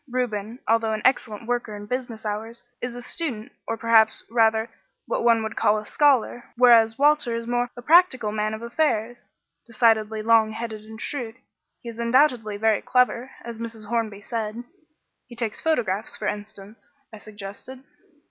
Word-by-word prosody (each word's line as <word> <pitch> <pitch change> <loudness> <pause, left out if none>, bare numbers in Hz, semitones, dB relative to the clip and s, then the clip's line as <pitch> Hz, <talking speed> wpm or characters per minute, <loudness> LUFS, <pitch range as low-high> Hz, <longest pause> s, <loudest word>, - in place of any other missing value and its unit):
Reuben, 235 -3 -3
although 225 0 +2
an 215 - -4
excellent 230 -4 +1
worker 240 -3 -2
in 205 0 -8
business 240 -1 -5
hours, 220 +3 -5 0.2
is 245 -1 -4
a 245 - -7
student, 250 -8 -3 0.2
or 225 - -2
perhaps 225 -1 +3
rather 225 -1 +3 0.4
what - - -2
one 230 -1 +4
would 220 - -5
call 210 - +2
a 210 - -6
scholar, 260 -3 +2
whereas 230 -2 +6
Walter 290 -4 +3
is 230 0 -4
more 245 +1 -1
a 245 - -8
practical 305 -8 +4
man 215 0 -1
of 220 - -10
affairs 240 -2 -1 0.4
decidedly 220 -2 +2
long 220 -1 +4
headed 220 -1 -6
and 220 0 -11
shrewd. 235 -3 -5 0.5
He 235 - -6
is 230 0 -10
undoubtedly 235 -3 +2
very 220 -1 +2
clever, 250 0 +1 0.2
as 235 -1 -7
Mrs. 225 -2 -7
Hornby 220 -4 -2
said." 225 0 -4 0.6
"He 240 - -12
takes 230 -2 -3
photographs, 225 -10 -1
for 210 - -6
instance," 205 +2 -7 0.2
I 215 - -9
suggested. 210 +5 -10
230 Hz, 165 wpm, -24 LUFS, 215-245 Hz, 0.6 s, whereas